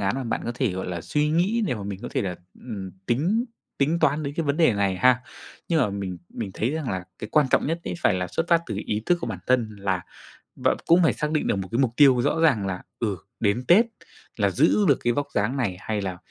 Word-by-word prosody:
án 100 +2 0
mà 135 -1 -3
bạn 115 - -2
có - - -2
thể, 125 -5 0
gọi 95 +1 -4
là, 90 -2 -4
suy 150 - 0
nghĩ 185 +9 +1
để 145 - 0
mà 105 - -6
mình 100 -1 -5
có - - -4
thể - - -1
là, 90 -3 -3 0.2
ừm, 100 -6 -6 0.2
tính 175 - +1 0.3
tính 150 +5 +2
toán 155 -1 +2
đến 140 -1 -4
cái 165 - 0
vấn 145 0 0
đề 160 -8 +4
này 100 -2 0
ha. 125 +5 +4 0.5
Nhưng 165 -3 +2
mà 115 - +2
mình 95 -3 -4
mình 105 -4 -5
thấy 115 - 0
rằng 155 -4 -3
là 95 -1 -3
cái 110 - -6
quan 150 -2 +4
trọng - - +3
nhất 165 +3 -1
ấy 90 - -3
phải - - +4
là 90 0 -1
xuất 165 - -2
phát 170 -1 +5
từ 100 - -4
ý 105 0 -1
thức 175 -1 +3
của - - -3
bản 105 -6 -4
thân 115 -4 +1
là 95 -3 -1 0.5
b - - -1 0.2
cũng 175 +2 +6
phải 160 - +4
xác 150 0 -2
định 155 - 0
được - - +2
một 95 -1 -4
cái 115 - 0
mục 130 -4 +3
tiêu 135 -4 +6
rõ 160 - +1
ràng 130 -12 +3
là, 95 -1 -4 0.2
ừ, 105 -5 -1 0.2
đến 110 +3 +1
Tết 205 +7 +7 0.5
là - - +2
giữ 210 - +3
được 140 - +5
cái 120 - +2
vóc 145 +3 -1
dáng 110 +7 0
này, 100 -9 -1
hay 105 +1 -3
là 95 -2 -4
120 Hz, 270 wpm, -25 LUFS, 100-150 Hz, 0.5 s, Tết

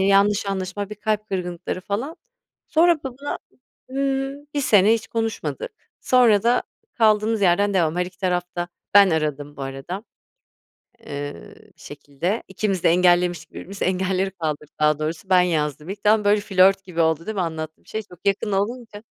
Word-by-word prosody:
yanlış 200 +1 +3
anlaşılma, 195 +1 -3
bir - - -5
kalp 215 0 -2
kırgınlıkları 180 -1 -4
falan. 230 - -4 0.5
Sonra 340 +2 +4
b - - -22
buna 270 +2 -5 0.5
Imm, 275 +1 -2
1 285 - +1
sene 210 -3 +5
hiç 220 -3 -2
konuşmadık, 225 - -3 0.3
sonra 235 -5 +4
da 240 +1 +3 0.3
kaldığımız 215 -1 +3
yerden 200 +2 +3
devam, 165 -3 +2
her 180 - +1
iki 180 -1 -15
taraf 180 -2 0
da 175 0 -2 0.3
Ben 200 -2 +8
aradım 150 -2 -2
bu - - -6
arada, 135 +10 -6 1.0
eee, 145 - -7 0.2
bir - - -24
şekilde 145 +8 -4
ikimiz 190 -1 -2
de - - +6
engellemiştik 175 -2 +2
birbirimizi, 195 +1 -6
engelleri 190 +1 0
kaldırdık 155 -4 -5
daha 150 0 +3
doğrusu 160 +5 -4
ben 185 -1 +6
yazdım 150 -3 -1
ilk. 200 +1 -6
Tam, 210 0 +4
böyle, 205 +1 +4
flört 195 -1 +4
gibi 175 -3 -4
oldu, 160 0 +1
değil 220 - -3
mi, 195 - -1
anlattığım 160 -2 -5
şey? 220 - -4
Çok 180 -2 -17
yakın 200 +1 +1
olunca. 210 +2 -3
195 Hz, 165 wpm, -23 LUFS, 170-215 Hz, 1.0 s, Ben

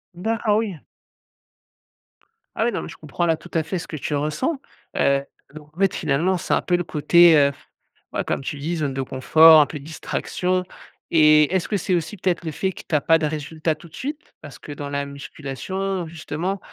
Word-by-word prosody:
D'acc 225 +6 -2
ah 210 -1 +4
oui! 210 -7 -2 1.8
Ah, 225 - +1
ouais, 240 - +1
non, - - -3
mais - - -7
je - - -11
comprends 155 +3 -3
là 165 -2 +2
tout 175 - -15
à 160 -2 +1
fait 185 +4 -3
ce - - -8
que - - -6
tu 145 +1 -3
ressens, 155 - -1 0.4
heu, 140 0 +2 0.3
donc, 150 -1 -13
en 180 - -13
fait, 195 -2 +3
finalement, 165 +4 +1
c'est 175 - -2
un - - +2
peu 180 - +1
le 175 - 0
côté, 170 +2 +5
heu 140 -1 +4
f - - -21 0.4
ouais - - -1
comme - - -2
tu 145 - -4
dis, 165 +4 -3
zone 145 -3 -1
de 135 - -2
confort, 155 +5 +6
un 145 - +4
peu 150 - -7
distraction 180 +4 -2 0.5
et 155 0 +5
est-ce 185 - 0
que 205 - +1
c'est 185 +1 -1
aussi 170 +4 -3
peut-être 180 -2 -1
le 160 - -2
fait 190 +5 -1
que - - -10
tu - - -8
as - - +4
pas 165 0 +4
de 155 - -1
résultats 155 +1 -2
tout 160 +3 -15
de 160 - -15
suite? 295 +3 -6
Parce 145 - -11
que 145 - -8
dans 145 0 -6
la 140 0 -2
musculation, 160 +7 -5
justement, 170 +4 -4
160 Hz, 220 wpm, -22 LUFS, 150-185 Hz, 1.8 s, confort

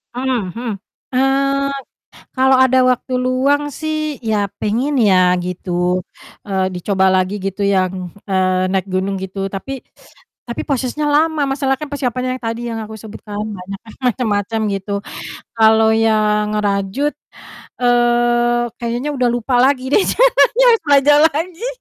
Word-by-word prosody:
Mhm 250 -8 -2
mhm, 240 +1 -5 0.4
eee, 275 +1 +1 0.6
kalau 265 0 +4
ada 260 0 +4
waktu 255 0 0
luang 275 +3 +1
sih, 310 -2 -3
ya 215 -3 0 0.2
pengen 240 +8 0
ya 185 -3 +4
gitu, 180 0 -2 0.4
eee, 190 -2 0
dicoba 190 +1 +1
lagi 185 +2 0
gitu 195 +1 -2
yang, 185 -2 -1 0.2
eee, 185 -1 +1
naik 190 0 0
gunung, 190 0 -2
gitu. 190 +1 -4
Tapi 255 +7 -6 0.7
tapi 235 - -3
prosesnya 275 +2 -1
lama, 310 0 +2
masalah 270 0 0
kan 305 - -5
persiapannya 255 -2 -2
yang - - -24
tadi 230 +1 -3
yang 225 -1 -4
aku 220 - -10
sebutkan 205 -1 -9
banyak 195 -1 -7
kan 220 - -12 0.2
macem-macem, 220 -2 -1 0.2
gitu. 200 +1 -4 0.6
Kalau 220 0 +5
yang 215 -1 +2
ngerajut, 205 +8 -1 0.7
eee, 240 0 +2 0.2
kayaknya 240 +4 -2
udah 250 -3 +1
lupa 245 +1 -1
lagi 260 0 +2
deh, 410 - +5
sayanya - - +3
harus 455 - +1
belajar 290 +1 +5
lagi 340 +8 -4
235 Hz, 140 wpm, -18 LUFS, 195-270 Hz, 0.7 s, Kalau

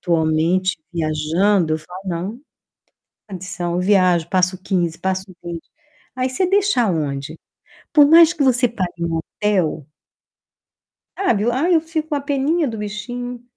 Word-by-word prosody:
atualmente, 170 +2 +1
viajando, 160 +2 +1
eu - - -2
falo: 180 +4 -11
não, 175 +2 -3
sem 265 - -22 0.9
condição. 180 -2 -4
Eu 180 - 0
viajo, 180 -4 +3
passo 185 0 +1
15, 175 -4 -1
passo 190 0 -2 0.2
20. 170 -1 -7 0.5
Aí 255 0 0
você 360 +8 0
deixa 400 -8 +2
aonde? 155 -6 -2 0.6
Por 295 -3 +7
mais 330 +2 +7
que 310 -5 -1
você 255 -1 +3
pague 180 -6 -4
um 165 -1 -1
hotel 165 -4 -1 1.3
sabe, 240 - +1
ai, 320 +9 +1
eu 320 - +4
fico 320 -1 -4
com 305 - -1
uma - - -1
peninha 285 +3 0
do 225 - -5
bichinho. 240 +4 -6
190 Hz, 145 wpm, -20 LUFS, 170-255 Hz, 1.3 s, Por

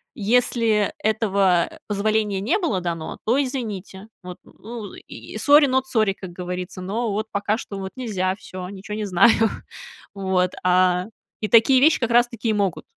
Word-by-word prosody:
если 225 -2 +1
этого 200 -5 +2 0.2
позволения 210 -1 0
не 285 - +1
было 335 - -1
дано, 165 -2 -5
то 250 +6 +2
извините, 215 -7 -5 0.2
вот, 180 0 -8
ну, 220 -2 -10
и - - -10
сори, 290 0 +6
нот 260 0 0
сори, 220 -6 +1
как 190 -2 -10
говорится, 180 +1 -6
но 220 +5 -2
вот 215 +2 -2
пока 205 +1 -1
что 200 -4 -7
вот 190 0 -6
нельзя, 190 -7 -1
всё, 185 -3 -9
ничего 200 +2 -7
не 215 0 -3
знаю. 195 +3 +5 0.8
Вот, 190 -2 0
а, 180 0 +3 0.4
и 215 - -1
такие 235 +3 +6
вещи 315 +3 +5
как 235 -2 -1
раз 240 +1 +5
таки 235 -1 -4
и - - +2
могут 200 -5 -1
205 Hz, 165 wpm, -22 LUFS, 185-230 Hz, 0.8 s, сори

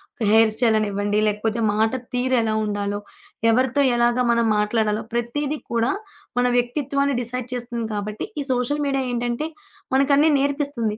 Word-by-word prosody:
ఒక 235 - -5
హెయిర్ 220 0 +5
స్టైలనివ్వండి, 210 -3 +1
లేకపోతే 215 +2 -1
మాట 220 +1 +2 0.2
తీరెలా 245 -3 +1
ఉండాలో, 205 0 -2 0.5
ఎవరితో 255 +4 +2 0.2
ఎలాగా 240 +1 +2
మనం 235 0 +2
మాట్లాడాలో, 210 0 0
ప్రతిదీ 280 +6 -1 0.2
కూడా 230 +1 +2 0.5
మన 250 - +3
వ్యక్తిత్వాన్ని 280 +2 0
డిసైడ్ 245 +1 -4
చేస్తుంది. 240 -1 -4
కాబట్టి, 210 +1 -4
ఈ - - -1
సోషల్ 270 +4 -1
మీడియా 270 -1 0
ఏంటంటే 240 +4 -2 0.5
మనకన్నీ 280 +3 +4
నేర్పిస్తుంది. 280 -6 -1
235 Hz, 130 wpm, -22 LUFS, 220-265 Hz, 0.5 s, హెయిర్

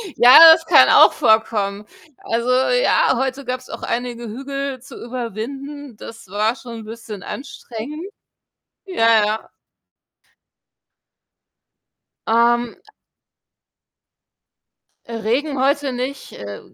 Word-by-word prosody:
Ja, 250 +5 +8
das 325 0 -3
kann - - +6
auch - - +6
vorkommen. 210 -2 0 0.4
Also, 235 +2 -2
ja, 480 - +2
heute 265 +1 -3
gab's 255 0 -6
auch - - -9
einige 240 0 -4
Hügel 275 +3 -6
zu 270 - -13
überwinden, 255 +3 -7
das 225 -2 -12
war 215 +4 -1
schon 230 -4 -10
bisschen 220 -3 -9
anstrengend. 275 +5 -8 0.8
Ja, 230 - +2
ja. 215 +1 -4 2.8
Ähm 235 +1 +1 2.3
Regen 235 +6 -3
heute 280 0 0
nicht. 260 +3 -6
Äh, 100 -1 -9
240 Hz, 95 wpm, -19 LUFS, 225-275 Hz, 2.8 s, Ja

